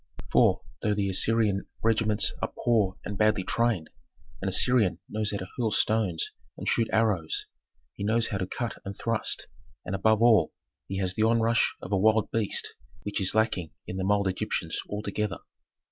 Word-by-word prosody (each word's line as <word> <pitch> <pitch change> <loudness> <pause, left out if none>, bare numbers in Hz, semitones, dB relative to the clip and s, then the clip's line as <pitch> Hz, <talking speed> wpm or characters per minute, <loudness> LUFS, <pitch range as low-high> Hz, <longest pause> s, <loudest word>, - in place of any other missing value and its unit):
For, 110 -6 +4 0.2
though 105 -1 +1
the 100 -1 0
Assyrian 105 0 +1 0.2
regiments 110 -2 +2
are - - -1
poor 105 -5 +2
and 100 -1 -5
badly 105 -3 +3
trained, 115 -7 0 0.5
an - - -1
Assyrian 110 -9 +3
knows 105 0 -2
how 105 - -2
to 95 - -6
hurl 115 -2 +2
stones 105 -5 +1 0.3
and - - -6
shoot 115 - +2
arrows; 105 -8 +1 0.5
he - - -6
knows 115 +3 +1
how 100 - -2
to 95 - -2
cut 120 +4 -4
and 100 0 -7
thrust, 115 -1 0 0.4
and, - - -4
above 110 +3 +3
all, 110 -9 +5 0.3
he 95 - -4
has 95 -2 -1
the 110 - -2
onrush 115 +1 +2
of 90 - -7
a 100 - +3
wild 110 +2 +3
beast, 110 -3 0 0.3
which 105 -1 -2
is 95 - 0
lacking 110 -7 +1
in 95 - -5
the 95 - -2
mild 100 0 +2
Egyptians 95 -3 -2
altogether. 105 0 -2
105 Hz, 175 wpm, -28 LUFS, 95-110 Hz, 0.5 s, all